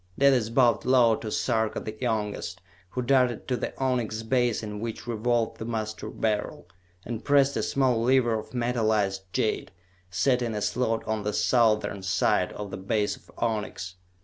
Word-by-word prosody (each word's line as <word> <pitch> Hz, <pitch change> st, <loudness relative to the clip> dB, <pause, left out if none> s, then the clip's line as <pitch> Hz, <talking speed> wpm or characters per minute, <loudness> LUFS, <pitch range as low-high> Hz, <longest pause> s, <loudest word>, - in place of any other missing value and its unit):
Dalis 130 Hz, -5 st, +4 dB
bowed 120 Hz, -2 st, +3 dB
low 125 Hz, -3 st, +5 dB
to 110 Hz, -, -6 dB
Sarka 110 Hz, -2 st, 0 dB
the 110 Hz, -, -6 dB
Youngest, 105 Hz, -6 st, -2 dB, 0.3 s
who 125 Hz, +6 st, -3 dB
darted 125 Hz, -2 st, +2 dB
to 125 Hz, -, +1 dB
the -, -, -3 dB
onyx 120 Hz, -4 st, -1 dB
base 120 Hz, -1 st, +1 dB
in 105 Hz, -1 st, -5 dB
which 115 Hz, 0 st, -5 dB
revolved 120 Hz, 0 st, 0 dB
the 110 Hz, -, -4 dB
Master 110 Hz, -2 st, -4 dB
Beryl, 105 Hz, -4 st, -2 dB, 0.4 s
and 115 Hz, -1 st, -5 dB
pressed 140 Hz, -1 st, +4 dB
a -, -, 0 dB
small 130 Hz, -4 st, +1 dB
lever 125 Hz, -1 st, +3 dB
of -, -, -10 dB
metalized 110 Hz, -5 st, 0 dB
jade, 105 Hz, 0 st, -1 dB, 0.4 s
set 125 Hz, +9 st, +2 dB
in 115 Hz, -2 st, -2 dB
a 105 Hz, -, -2 dB
slot 115 Hz, +1 st, -1 dB
on 110 Hz, -1 st, -1 dB
the 105 Hz, 0 st, -2 dB
southern 110 Hz, -4 st, +2 dB
side 95 Hz, -1 st, +1 dB
of 105 Hz, -1 st, -6 dB
the -, -, -5 dB
base 105 Hz, +2 st, 0 dB
of -, -, -21 dB
onyx. 105 Hz, -6 st, -3 dB
115 Hz, 170 wpm, -27 LUFS, 105-125 Hz, 0.4 s, low